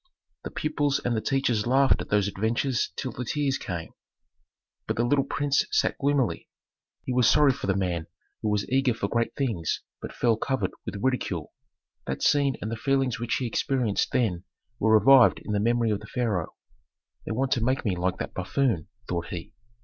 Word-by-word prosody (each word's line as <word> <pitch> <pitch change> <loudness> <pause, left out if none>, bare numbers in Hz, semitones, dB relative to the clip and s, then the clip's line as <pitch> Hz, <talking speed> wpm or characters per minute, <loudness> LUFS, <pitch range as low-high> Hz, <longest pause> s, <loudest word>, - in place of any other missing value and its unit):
The - - -5
pupils 145 -2 0
and 120 -1 -1
the 110 - 0
teachers 120 -3 0
laughed 135 +2 +4
at - - -7
those 105 -1 +2
adventures 115 +5 0
till 130 - -3
the 125 - -5
tears 140 +2 -1
came; 85 -3 -5 1.0
but - - -1
the 120 - +1
little 135 +3 +3
prince 140 0 +1
sat - - +1
gloomily; 140 -4 0 0.5
he 130 - -3
was 125 -2 +4
sorry 145 -2 +5
for 130 -5 -5
the 95 - +2
man 90 -4 -1 0.3
who 110 - 0
was 105 -1 0
eager 130 -2 +2
for 100 - -2
great 115 +2 -1
things 110 - -1 0.2
but - - -6
fell 115 -3 +1
covered 130 +3 -1 0.2
with - - -4
ridicule. 100 - -1 0.5
That - - -3
scene 140 -2 +3
and 110 - -3
the 115 - -3
feelings 135 -1 0
which 120 +1 -1
he 130 - -2
experienced 120 -2 0
then 95 -8 0 0.4
were 110 +1 +5
revived 135 +2 +6
in - - -4
the 105 - +1
memory 115 +1 +2
of 105 - 0
the 110 - -12
pharaoh. 110 -9 -2 0.7
"They - - -2
want 130 +4 -1
to 120 - +2
make 130 +2 0
me 100 -4 +1
like 90 +1 -1
that - - -5
buffoon," 95 - 0 0.2
thought 85 -1 -3
he. 85 -3 -7
120 Hz, 190 wpm, -26 LUFS, 105-135 Hz, 1.0 s, revived